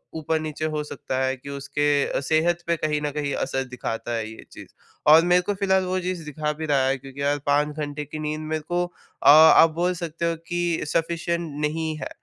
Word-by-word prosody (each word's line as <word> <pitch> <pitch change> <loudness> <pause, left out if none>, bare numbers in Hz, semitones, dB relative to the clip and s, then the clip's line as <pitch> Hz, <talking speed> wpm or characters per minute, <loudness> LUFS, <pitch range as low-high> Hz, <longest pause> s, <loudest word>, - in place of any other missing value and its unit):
ऊपर-नीचे 155 -1 -2
हो 150 - -1
सकता 130 -3 -5
है 130 0 0
कि 135 +3 -11
उसके 145 +1 0
सेहत 165 +4 +1
पे 170 - +2
कहीं 150 -1 -1
न 150 -1 -2
कहीं 145 -1 -2
असर 135 0 -1
दिखाता 120 -2 -5
है 110 -1 -3
ये 110 - -12
चीज़ - - -11 0.4
और 160 +1 +9
मेरे 180 0 +4
को 205 +3 -2
फिलहाल 190 -1 +1
वो 185 +1 -1
चीज़ 180 -2 -4
दिखा 150 +1 -2
भी 160 +1 -5
रहा 140 -3 +2
है, 135 +1 +1
क्योंकि 135 +1 -10
यार 145 +1 +1
5 145 +1 +1
घंटे 150 0 -4
की 150 +2 -7
नींद 155 0 -3
मेरे 155 0 -2
को 175 0 0 0.4
अ, - - +7
आप 160 +2 +8
बोल 175 +2 +1
सकते 170 -1 -4
हो 165 - -1
कि 175 -1 -1
सफ़िशिएंट 170 +1 -1
नहीं 155 +1 -1
है। - - -4
155 Hz, 210 wpm, -24 LUFS, 145-170 Hz, 0.4 s, और